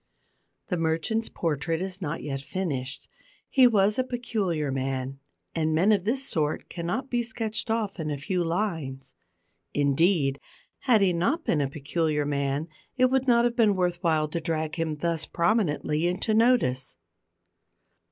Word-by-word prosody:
The 180 Hz, -, 0 dB
merchant's 165 Hz, +8 st, 0 dB
portrait 165 Hz, 0 st, -1 dB
is 190 Hz, +1 st, -4 dB
not 165 Hz, -1 st, -3 dB
yet 135 Hz, -2 st, -3 dB
finished. 140 Hz, -6 st, -4 dB, 0.4 s
He 260 Hz, -2 st, +6 dB
was 210 Hz, 0 st, +3 dB
a -, -, +3 dB
peculiar 205 Hz, -, -2 dB
man, 135 Hz, 0 st, -3 dB, 0.3 s
and 160 Hz, -1 st, 0 dB
men 185 Hz, +7 st, +4 dB
of 200 Hz, -3 st, +2 dB
this 260 Hz, +5 st, 0 dB
sort 155 Hz, -1 st, -1 dB
cannot 180 Hz, +11 st, -3 dB
be 240 Hz, -1 st, +2 dB
sketched 225 Hz, -1 st, -3 dB
off 220 Hz, -4 st, -1 dB
in 155 Hz, -1 st, -2 dB
a 145 Hz, -, -2 dB
few 175 Hz, +6 st, -1 dB
lines. 160 Hz, -8 st, -3 dB, 0.6 s
Indeed, 140 Hz, 0 st, +2 dB, 0.4 s
had 235 Hz, -5 st, +3 dB
he 190 Hz, -2 st, +4 dB
not 235 Hz, -, 0 dB
been 150 Hz, -, +2 dB
a 140 Hz, -, 0 dB
peculiar 150 Hz, +1 st, -1 dB
man, 140 Hz, +1 st, -1 dB, 0.3 s
it 255 Hz, 0 st, +4 dB
would 265 Hz, 0 st, +1 dB
not 235 Hz, -1 st, +5 dB
have 240 Hz, 0 st, 0 dB
been 220 Hz, -4 st, +4 dB
worth 180 Hz, -1 st, 0 dB
while 160 Hz, -4 st, +2 dB
to 165 Hz, +2 st, -3 dB
drag 160 Hz, -2 st, -2 dB
him 165 Hz, -2 st, -2 dB
thus 165 Hz, +1 st, -2 dB
prominently 170 Hz, -4 st, +1 dB
into 185 Hz, +5 st, 0 dB
notice. 220 Hz, -, +2 dB
170 Hz, 155 wpm, -27 LUFS, 150-215 Hz, 0.6 s, He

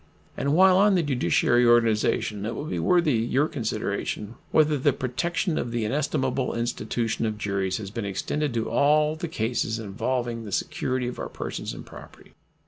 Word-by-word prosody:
And 140 Hz, +2 st, 0 dB
while 185 Hz, +1 st, +6 dB
on 200 Hz, 0 st, +5 dB
the 175 Hz, -, +2 dB
judiciary 125 Hz, -3 st, +2 dB
organization 115 Hz, -3 st, +2 dB
it 115 Hz, +3 st, -3 dB
will 145 Hz, -, -5 dB
be 155 Hz, -, -3 dB
worthy 175 Hz, -5 st, +3 dB
your 125 Hz, +6 st, +1 dB
consideration 110 Hz, -5 st, -3 dB, 0.2 s
whether 155 Hz, -1 st, +3 dB
the 140 Hz, 0 st, +2 dB
protection 155 Hz, +7 st, -1 dB
of 120 Hz, -, -3 dB
the 115 Hz, -2 st, -1 dB
inestimable 130 Hz, +1 st, -1 dB
institution 115 Hz, -1 st, -1 dB
of 105 Hz, -1 st, -3 dB
juries 100 Hz, -3 st, -1 dB
has 100 Hz, -3 st, -7 dB
been 115 Hz, +1 st, -4 dB
extended 145 Hz, +9 st, -2 dB
to 115 Hz, -, -1 dB
all 150 Hz, +2 st, +3 dB
the 165 Hz, +2 st, -4 dB
cases 115 Hz, -5 st, -1 dB
involving 115 Hz, +3 st, -2 dB
the 105 Hz, -, -8 dB
security 130 Hz, +6 st, -1 dB
of 125 Hz, -, -6 dB
our -, -, -4 dB
persons -, -, -5 dB
and -, -, -9 dB
property. -, -, -14 dB
125 Hz, 170 wpm, -25 LUFS, 110-150 Hz, 0.2 s, while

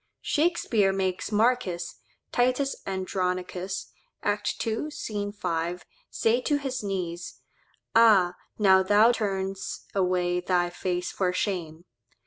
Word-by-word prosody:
Shakspeare 235 Hz, -, +2 dB
makes 190 Hz, +1 st, -2 dB
Marcus 210 Hz, -6 st, +1 dB, 0.3 s
('Titus 255 Hz, +3 st, +1 dB
Andronicus,' 185 Hz, 0 st, -3 dB, 0.3 s
act 205 Hz, 0 st, -1 dB
ii, 225 Hz, +7 st, -2 dB
sc. 295 Hz, -, -6 dB, 0.3 s
5) 170 Hz, -1 st, -2 dB, 0.2 s
say 230 Hz, +3 st, +1 dB
to 290 Hz, +3 st, +1 dB
his 270 Hz, -3 st, -3 dB
niece, 180 Hz, -4 st, -4 dB, 0.5 s
"Ah! 210 Hz, -6 st, +6 dB, 0.2 s
now 190 Hz, -3 st, +6 dB
thou 205 Hz, +4 st, +5 dB
turn'st 195 Hz, -4 st, -3 dB
away 180 Hz, -2 st, +1 dB
thy 180 Hz, -1 st, +1 dB
face 180 Hz, 0 st, -2 dB
for 185 Hz, -2 st, 0 dB
shame." 175 Hz, -4 st, -3 dB
190 Hz, 110 wpm, -27 LUFS, 180-225 Hz, 0.5 s, Ah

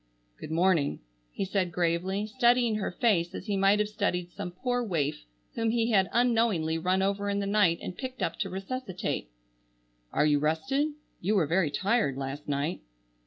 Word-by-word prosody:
"Good -, -, -7 dB
morning," 165 Hz, -, +2 dB, 0.3 s
he 195 Hz, -, -3 dB
said 190 Hz, -2 st, 0 dB
gravely, 180 Hz, +4 st, 0 dB
studying 240 Hz, -1 st, +3 dB
her 205 Hz, -, -2 dB
face 180 Hz, -5 st, +1 dB
as -, -, -6 dB
he 205 Hz, -2 st, -1 dB
might 195 Hz, +1 st, +4 dB
have 210 Hz, 0 st, +1 dB
studied 190 Hz, -5 st, -2 dB
some 180 Hz, -, -5 dB
poor 245 Hz, +7 st, -1 dB
waif 150 Hz, -, -2 dB, 0.3 s
whom 225 Hz, 0 st, 0 dB
he 230 Hz, 0 st, +1 dB
had 190 Hz, -3 st, +3 dB
unknowingly 225 Hz, -10 st, +2 dB
run 185 Hz, +3 st, +1 dB
over 200 Hz, +1 st, 0 dB
in 200 Hz, -, 0 dB
the 200 Hz, -, -1 dB
night 200 Hz, -4 st, +3 dB
and 180 Hz, -, -5 dB
picked 260 Hz, -1 st, -5 dB
up -, -, -2 dB
to 195 Hz, -, -1 dB
resuscitate. 190 Hz, -, -4 dB, 0.8 s
"Are -, -, +2 dB
you 145 Hz, -1 st, +3 dB
rested? 265 Hz, -, 0 dB, 0.3 s
You 205 Hz, +5 st, 0 dB
were 180 Hz, -6 st, +3 dB
very 170 Hz, +1 st, +2 dB
tired 195 Hz, -, +1 dB
last 140 Hz, +2 st, -5 dB
night." 145 Hz, +4 st, -1 dB
195 Hz, 175 wpm, -28 LUFS, 170-225 Hz, 0.8 s, might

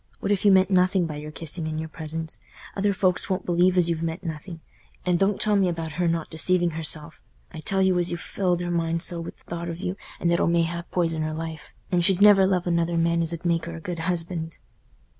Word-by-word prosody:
What 200 Hz, -, -1 dB
if 200 Hz, -, +1 dB
you 205 Hz, -, +6 dB
meant 190 Hz, +1 st, +4 dB
nothing 185 Hz, -1 st, +3 dB
by 155 Hz, -2 st, -5 dB
your 150 Hz, +1 st, -7 dB
kissing 160 Hz, +1 st, -4 dB
and 155 Hz, 0 st, -3 dB
your 160 Hz, -, -4 dB
presents? 160 Hz, 0 st, -5 dB, 0.4 s
Other 200 Hz, +1 st, +2 dB
folks 185 Hz, -1 st, +1 dB
won't 185 Hz, -1 st, -1 dB
believe 180 Hz, +1 st, +3 dB
as 175 Hz, -2 st, +4 dB
you've 165 Hz, -1 st, -1 dB
meant 165 Hz, +1 st, -3 dB
nothing; 165 Hz, +1 st, -6 dB, 0.5 s
and 180 Hz, -1 st, +2 dB
don't 195 Hz, +1 st, +2 dB
tell 210 Hz, -1 st, +2 dB
me 195 Hz, -2 st, +3 dB
about 165 Hz, -2 st, -4 dB
her 175 Hz, +3 st, 0 dB
not 165 Hz, -1 st, -1 dB
deceiving 175 Hz, +2 st, +1 dB
herself. 155 Hz, 0 st, -4 dB, 0.3 s
I 160 Hz, -, -7 dB
tell 190 Hz, +4 st, 0 dB
you 185 Hz, -1 st, +3 dB
as 175 Hz, -, 0 dB
you've 170 Hz, -, -2 dB
filled 180 Hz, -2 st, -1 dB
her 175 Hz, 0 st, -2 dB
mind 165 Hz, -1 st, 0 dB
so 170 Hz, -1 st, -1 dB
with 165 Hz, -, -8 dB
the -, -, -24 dB
thought 170 Hz, 0 st, -5 dB
of 165 Hz, -, -5 dB
you 185 Hz, 0 st, -3 dB, 0.2 s
as -, -, 0 dB
it'll 170 Hz, 0 st, +2 dB
mayhap 170 Hz, 0 st, 0 dB
poison 165 Hz, -3 st, 0 dB
her 155 Hz, 0 st, -2 dB
life, 160 Hz, -1 st, -6 dB, 0.2 s
and 175 Hz, -1 st, +2 dB
she'll 185 Hz, +1 st, +4 dB
never 200 Hz, -2 st, +7 dB
love 185 Hz, -2 st, +1 dB
another 170 Hz, -1 st, +1 dB
man 170 Hz, 0 st, +2 dB
as 165 Hz, 0 st, -1 dB
'ud 170 Hz, +1 st, -6 dB
make 170 Hz, -1 st, +1 dB
her 170 Hz, 0 st, -6 dB
a -, -, -7 dB
good 170 Hz, +1 st, -5 dB
husband." 165 Hz, -1 st, -2 dB
170 Hz, 240 wpm, -25 LUFS, 165-180 Hz, 0.5 s, never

